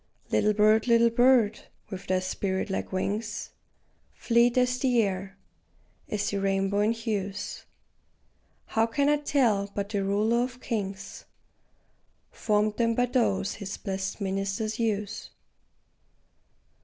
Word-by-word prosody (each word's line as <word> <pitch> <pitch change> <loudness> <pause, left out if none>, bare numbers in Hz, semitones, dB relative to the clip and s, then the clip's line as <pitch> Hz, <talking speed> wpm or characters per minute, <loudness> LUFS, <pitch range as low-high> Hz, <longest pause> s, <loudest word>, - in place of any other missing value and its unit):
Little 210 0 +2
bird, 215 +2 +4
little 235 0 +5
bird, 240 -2 +4 0.3
with 190 0 -7
thy 185 - +2
spirit 190 +1 -2
like - - -3
wings, 205 +3 -3 0.6
Fleet 235 +1 +3
as 250 0 +2
the 250 -3 +2
air, 195 0 -4 0.7
as 210 0 -1
the 200 - -1
rainbow 195 +1 +1
in 210 +2 +3
hues, 205 -4 -4 1.0
How 225 0 +1
can 280 +5 +1
I 295 - +4
tell 240 -9 +1
but 200 0 -2
the 200 -2 -1
Ruler 210 +4 +2
of 250 0 -6
kings 200 -5 -5 1.1
Formed 210 0 0
them 230 -1 +2
by 245 - +3
those 225 -6 0
his 200 -1 -6
blest 190 -1 -4
ministers 195 +3 -2
use? 215 -1 -2
210 Hz, 125 wpm, -27 LUFS, 195-235 Hz, 1.1 s, little